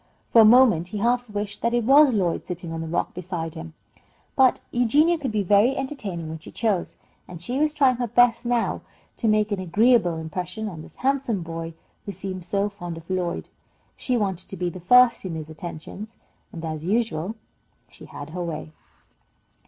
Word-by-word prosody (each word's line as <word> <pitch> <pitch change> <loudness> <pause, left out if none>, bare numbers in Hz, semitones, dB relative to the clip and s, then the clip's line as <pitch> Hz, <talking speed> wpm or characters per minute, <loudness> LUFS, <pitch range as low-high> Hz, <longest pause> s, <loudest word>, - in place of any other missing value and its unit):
For 230 - +8
a - - +7
moment 220 -7 +6
he 210 - -6
half 240 +3 +1
wished 205 0 -4
that 235 +1 +1
it 240 - +1
was 280 +4 +6
Lloyd 185 -7 -1
sitting 175 -2 -6
on 165 - -4
the 165 - -5
rock 165 - -2
beside 170 -3 -5
him, 165 -1 -9 0.6
but 265 -2 +4
Eugenia 295 +8 +3
could 270 -5 -3
be 210 -1 0
very 205 +7 +4
entertaining 210 - -4
when 160 0 -6
she 155 - -12
chose, 210 -6 -1 0.3
and 175 -2 -9
she 245 +10 -3
was 305 0 +2
trying 275 -5 +3
her 245 -1 -1
best 240 +2 +4
now 240 -1 0 0.4
to 230 - -1
make 215 0 +2
an 200 - -1
agreeable 195 0 +3
impression 180 +7 -5
on 170 -6 -7
this - - -13
handsome 265 -8 0
boy 165 0 -6 0.3
who - - -2
seemed 185 -1 -6
so 200 +2 0
fond 175 -5 -7
of 165 0 -12
Lloyd. 180 -2 -2 0.5
She 250 -2 0
wanted 190 -5 -2
to 195 - -7
be 175 0 -2
first 235 +8 +4
in 180 -4 -4
his 155 0 -7
attentions, 175 +7 -8 0.4
and, 165 -1 -7
as 155 -1 -5
usual, 205 -1 -1 0.5
she - - -15
had 145 +2 -9
her 180 +1 -4
way. 165 -2 -5
200 Hz, 190 wpm, -24 LUFS, 170-240 Hz, 0.6 s, For